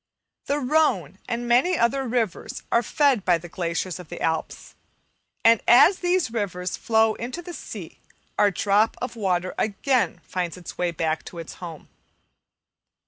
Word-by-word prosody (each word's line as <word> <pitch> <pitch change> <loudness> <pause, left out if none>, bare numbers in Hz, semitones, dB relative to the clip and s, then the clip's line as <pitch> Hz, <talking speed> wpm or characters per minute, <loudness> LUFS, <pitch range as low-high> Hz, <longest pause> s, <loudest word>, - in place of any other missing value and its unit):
The 285 - +1
Rhone 250 - +1
and 240 0 -2
many 255 +10 +3
other 260 +3 +1
rivers 225 -6 -2
are 235 - +4
fed 265 -2 +2
by 175 -2 +3
the 170 +1 -10
glaciers 170 +1 -3
of 180 - -11
the - - -7
Alps; 160 -1 -3 0.7
and 230 -1 +6
as 285 +11 +7
these 355 -7 +1
rivers 185 -5 -2
flow 220 -1 +2
into 250 +11 -6
the 350 - -8
sea, - - -9 0.4
our 205 - +4
drop 205 +3 +2
of 250 - -4
water 185 -4 -1
again 230 +3 0
finds 180 -2 -3
its 180 - -9
way 180 - 0
back 160 -1 -2
to 175 - -10
its 165 -1 -7
home. 165 -3 -8
215 Hz, 155 wpm, -24 LUFS, 180-250 Hz, 0.7 s, as